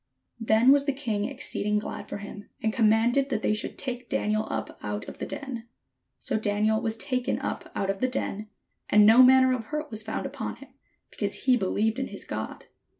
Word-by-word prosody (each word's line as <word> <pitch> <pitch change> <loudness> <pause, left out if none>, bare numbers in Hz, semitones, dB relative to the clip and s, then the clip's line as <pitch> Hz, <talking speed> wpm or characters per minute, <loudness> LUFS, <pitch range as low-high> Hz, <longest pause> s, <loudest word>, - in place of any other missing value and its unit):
Then 225 +3 +5
was 280 0 +4
the 280 - +1
king 225 -7 -2
exceeding 235 -5 -2
glad 210 - -5
for - - -4
him, 205 0 -9
and 220 0 +1
com 220 -2 +4
manded 240 +5 +3
that 225 -5 -2
they - - +2
should 215 - -3
take 250 -3 -5
Daniel 215 +1 0
up 110 0 -4
out 105 0 -4
of - - -9
the - - -4
den. 265 -5 -6 0.5
So - - -2
Daniel 215 +1 +1
was 225 -2 -2
taken 250 +1 -1
up - - -5
out 195 0 0
of 195 - -6
the 255 - +3
den, 215 -4 -3 0.4
and 210 0 +6
no 225 +4 +8
man 260 +1 +7
ner 260 0 +3
of 240 -3 -3
hurt 300 +3 -4
was 220 -1 -4
found 220 +1 -4
upon - - -4
him, - - -14 0.4
because - - -2
he 255 -2 +5
believed 220 +2 0
in 265 - -2
his - - -8
God. - - -5
225 Hz, 210 wpm, -27 LUFS, 210-255 Hz, 0.5 s, no